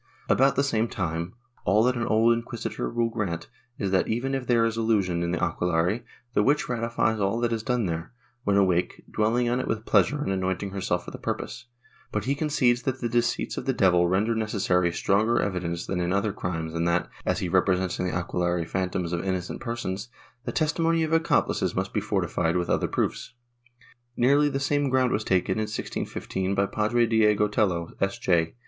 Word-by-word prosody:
^ - - +6
About 135 +1 +3
the 140 - +2
same 115 -5 +1
time, 85 -2 -3 0.3
all 105 +3 +3
that 125 +1 +2
an 120 0 -2
old 115 +2 +4
inquisitor 115 -1 -4
will 115 0 0
grant 90 -7 -3 0.3
is 100 -2 -2
that, 95 - +2
even 120 +4 -1
if 135 -2 -2
there 115 -2 +4
is 115 -1 -1
illusion 105 -6 +1
in 85 - -1
the 90 - -1
aquelarre, 90 +4 +1 0.3
the - - +3
witch 145 +7 +2
ratifies 115 -2 0
all 100 +3 0
that 120 -1 0
is 115 - -1
done 125 -1 0
there, 85 -1 -3 0.3
when 100 -1 +2
awake, 90 -3 +1
dwelling 115 +3 +1
on 120 +1 +1
it - - -3
with 110 0 -2
pleasure 150 - +3
and - - -2
anointing 95 +1 -2
herself 95 -1 -2
for - - -7
the - - -8
purpose, - - -4 0.4
but - - -2
he 135 - +1
concedes 140 -5 +1
that 130 -1 -2
the 120 - -1
deceits 120 0 0
of - - -5
the 135 - +2
devil 90 -6 +4
render 100 +6 +1
necessary 100 -5 +1
stronger 110 +7 +2
evidence 85 -3 -2
than 95 - -2
in 90 0 0
other 100 +1 +1
crimes 80 -5 -4
and 85 +1 0
that, 85 +1 +1 0.2
as - - 0
he 90 - -2
represents 90 0 +1
in 90 - 0
the - - -1
aquelarre 85 -1 -1
phantoms 90 -1 -2
of 85 - -1
innocent 95 -2 -3
persons, 115 -2 -4 0.4
the - - -2
testimony 165 +1 +1
of 160 0 -1
accomplices 165 +1 +1
must - - -2
he - - 0
fortified 85 0 0
with 90 - -1
other - - +1
proofs.^ 120 - -2 0.8
Nearly 140 +4 +4
the 135 - -2
same 145 +1 +1
ground 130 -1 +2
was 110 - 0
taken, 95 +1 +1
in 110 - 0
1650, 95 -2 -3
by 100 0 +2
Padre 110 +4 +1
Diego 105 -2 +3
Tello, 90 -5 0
S. 95 0 0
J. 85 0 +1
105 Hz, 200 wpm, -26 LUFS, 90-120 Hz, 0.8 s, ^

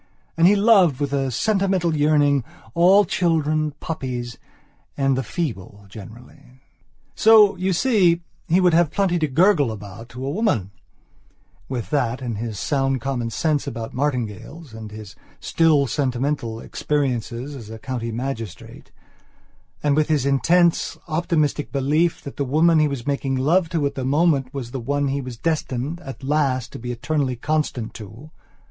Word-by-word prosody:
And 165 +1 +5
he 205 - +5
loved, 200 - +4
with 145 -1 -2
a 135 -1 0
sentimental 190 - +1
yearning, 145 -2 +3 0.3
all 190 +4 +5
children, 155 -3 0
puppies, 125 -6 -5 0.6
and 135 -1 +2
the 130 - 0
feeble 110 - -5
generally.... 115 +5 -13 0.5
So, 215 -3 +6
you 185 +2 0
see, 180 -5 +2 0.2
he 175 +3 +3
would 180 -2 +4
have 170 -1 +4
plenty 180 -1 0
to 155 - +1
gurgle 150 - +3
about 105 +2 -9
to 125 +2 -7
a 140 - -2
womanwith 120 - -5
that 125 -4 0
and 120 -5 -4
his 110 -2 -4
sound 135 -2 0
common 125 -4 -3
sense 150 +4 -1
about 115 -1 -5
martingales 130 - -4
and 110 -1 -8
hisstill 140 - -1
sentimentalexperiences 130 0 -2
as 115 -5 -10
a 110 - -8
county 115 0 -4
magistrate; 115 -4 -6 0.9
and 145 -1 +2
with 155 0 +2
his 150 -4 +1
intense, 170 +5 +2
optimistic 155 -2 0
belief 150 +5 +1
that 140 - -9
the 140 - 0
woman 155 +4 +3
he 155 - +4
was 135 -4 -5
making 140 -1 -1
love 160 +7 +2
to 160 -4 -1
at 140 - -1
the 135 - -4
moment 140 -1 +2
was 130 -4 -6
the 130 - -4
one 140 +3 -1
he 140 +1 -1
was 125 -3 -8
destined, 155 0 -2
at 135 -5 -10
last, 135 -3 0
to - - -8
be 120 +1 -5
eternally 130 +1 -1
constant 130 -3 -2
to.... 115 +8 -11
140 Hz, 150 wpm, -22 LUFS, 125-160 Hz, 0.9 s, So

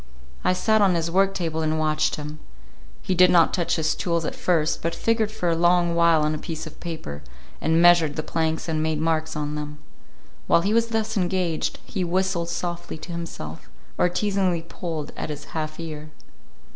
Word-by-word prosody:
I 185 - +3
sat 220 +3 +2
on 190 -3 +4
his 165 0 -1
work 195 +2 +3
table 160 -3 -2
and 155 0 0
watched 155 0 +1
him. 150 +1 -7 0.6
He - - 0
did 180 0 +6
not 170 -2 +5
touch 175 -3 +1
his 155 -1 +1
tools 170 -2 -1
at 260 - -2
first, 180 -11 +1
but 165 0 -1
figured 225 +2 +1
for 215 -5 -3
a 165 - +3
long 175 0 +3
while 170 -2 +4
on 155 0 +1
a 155 - -3
piece 160 -1 -5
of 155 - -11
paper, 155 - -6 0.4
and 160 +1 +2
measured 170 -4 +6
the 155 - -3
planks 160 0 -1
and 155 -1 0
made 155 -1 0
marks 160 0 0
on 150 -1 -2
them. 150 0 -5 0.7
While 170 - +5
he 200 +4 0
was 230 0 +3
thus 220 -1 -1
engaged, 180 -3 0
he 190 -4 -3
whistled 180 -1 0
softly 175 -1 -4
to 175 - -9
himself, 165 - -7 0.3
or 180 - +2
teasingly 190 -3 0
pulled 165 -3 -5
at - - -5
his 150 -1 -5
half 155 -1 -4
ear. 155 -2 -6
170 Hz, 195 wpm, -24 LUFS, 155-180 Hz, 0.7 s, did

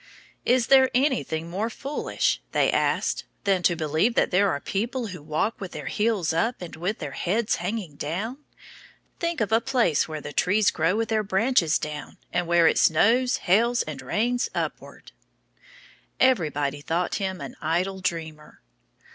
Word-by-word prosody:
"Is 250 -1 +3
there 265 0 +6
anything 250 - 0
more 200 +7 -2
foolish," 275 +5 -2
they - - +3
asked, - - 0 0.2
"than 195 -2 +2
to 175 0 +3
believe 160 +8 +1
that - - +2
there 195 +2 +3
are 145 - -1
people 230 - -3
who 180 -4 -8
walk 155 +10 -2
with 190 - -6
their - - -6
heels 210 -7 0
up 225 +9 0
and 175 -2 -8
with 180 +7 -2
their 150 -4 -6
heads 210 +9 0
hanging 180 -5 -4
down?" 200 - -4 0.8
"Think 340 -5 -1
of 220 - 0
a 225 +1 +4
place 240 - +1
where 155 -1 -5
the 145 0 -8
trees 200 +8 +3
grow 165 +4 +1
with 225 0 -1
their 220 -1 +2
branches 195 -4 +2
down, 150 -1 -6 0.2
and 175 -1 0
where 170 -1 +4
it - - +4
snows, 235 +10 +3
hails, 235 +6 +3
and - - -7
rains 240 +3 0
upward!" - - -5 1.1
Everybody 145 - +1
thought 170 +4 -1
him 190 -2 -2
an 140 -3 -7
idle 180 +5 -1
dreamer. 160 -4 -5
190 Hz, 165 wpm, -25 LUFS, 160-230 Hz, 1.1 s, there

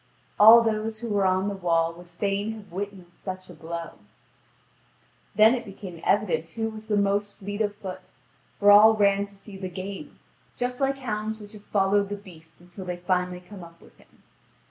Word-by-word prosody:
All 225 +3 +10
those 220 0 -1
who 235 +1 -6
were 200 -2 +2
on 185 +1 +1
the 205 - -1
wall 165 -3 +1
would 175 +1 -14
fain 200 +4 -2
have 210 -4 -12
witnessed 190 -2 -7
such 185 -1 -7
a - - -11
blow. 165 0 -7 1.4
Then 220 +2 +7
it 245 -2 -2
became 195 -5 -10
evident 170 -6 +1
who 225 0 -2
was 220 0 -10
the 210 -1 +1
most 200 0 0
fleet 205 +2 -5
of 205 -1 0
foot, 185 -2 -8 0.5
for 205 0 +6
all 215 +2 +8
ran 200 -1 +2
to 200 - -18
see 195 0 -11
the 190 -1 -5
game, 190 +2 -7 0.4
just 250 +1 -3
like 270 0 +1
hounds 220 -4 -3
which 210 0 -12
have 210 -1 -13
followed 200 0 +2
the 205 - -3
beast 165 -5 -15
until 180 +2 -10
they 180 -1 -4
finally 180 0 -1
come 185 0 -11
up 170 0 -14
with - - -19
him. - - -25
200 Hz, 190 wpm, -26 LUFS, 180-215 Hz, 1.4 s, All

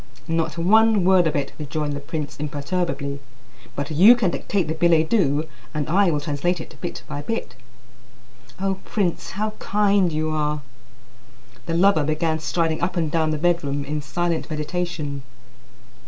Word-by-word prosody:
"Not 165 -1 -1
one 215 +3 +4
word 185 -2 +5
of 155 - -1
it," 140 -2 -2
rejoined 150 0 -2
the 140 - -4
prince 145 +1 -5
imperturbably; 145 -1 -3 0.6
"but 145 +2 -3
you 195 +11 +8
can 205 -8 +1
dictate 190 -2 -1
the 155 - -1
billet 160 -1 +3
doux, 155 -8 +2 0.3
and 150 -1 -1
I 190 +3 +3
will 150 -3 +1
translate 150 +5 -1
it - - -9
bit 175 - -5
by 145 - -5
bit." 225 - -4 1.1
"O 195 0 -1
prince, 190 -6 -1
how 215 +1 0
kind 200 -3 +2
you 155 0 -1
are!" 150 -1 -1 1.0
The 165 - -1
lover 185 -3 +4
began 155 +2 0
striding 160 0 -1
up 175 +1 -1
and 160 -3 0
down 160 -1 +1
the 155 - 0
bedroom 150 -4 0
in 150 +1 -3
silent 170 +4 -2
meditation. 150 -2 -3
160 Hz, 155 wpm, -23 LUFS, 150-180 Hz, 1.1 s, you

